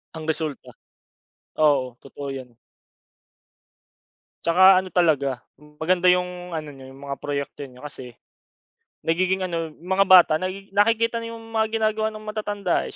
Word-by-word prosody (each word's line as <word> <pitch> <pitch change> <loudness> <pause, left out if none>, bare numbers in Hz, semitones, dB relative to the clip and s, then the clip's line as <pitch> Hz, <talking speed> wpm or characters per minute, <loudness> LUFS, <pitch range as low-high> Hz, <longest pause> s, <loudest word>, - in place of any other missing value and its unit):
Ang 160 0 -7
resulta. 155 -2 -3 0.9
Oo, 135 -5 +2
totoo 140 +1 -9
'yan. 130 -3 -9 1.9
Tsaka 185 +2 +6
ano 185 - -9
talaga, 145 -7 +2 0.4
maganda 180 +3 +2
'yung 180 0 0
ano 155 -2 -7
niyo 135 -1 -12
'yung 135 - -14
mga 140 - -3
proyekto 140 0 -4
niyo, 125 +3 -14
kasi 125 -5 -9 0.9
nagiging 185 +3 +1
ano 165 -3 -3
mga 190 +3 +1
bata 180 -4 +8
na 185 - -1 0.2
nakikita 230 +3 +2
'yung 230 0 -8
mga 220 -1 +1
ginagawa 215 0 +1
ng 215 0 -7
matatanda 205 -3 -2
eh, - - -10
175 Hz, 135 wpm, -23 LUFS, 145-195 Hz, 1.9 s, bata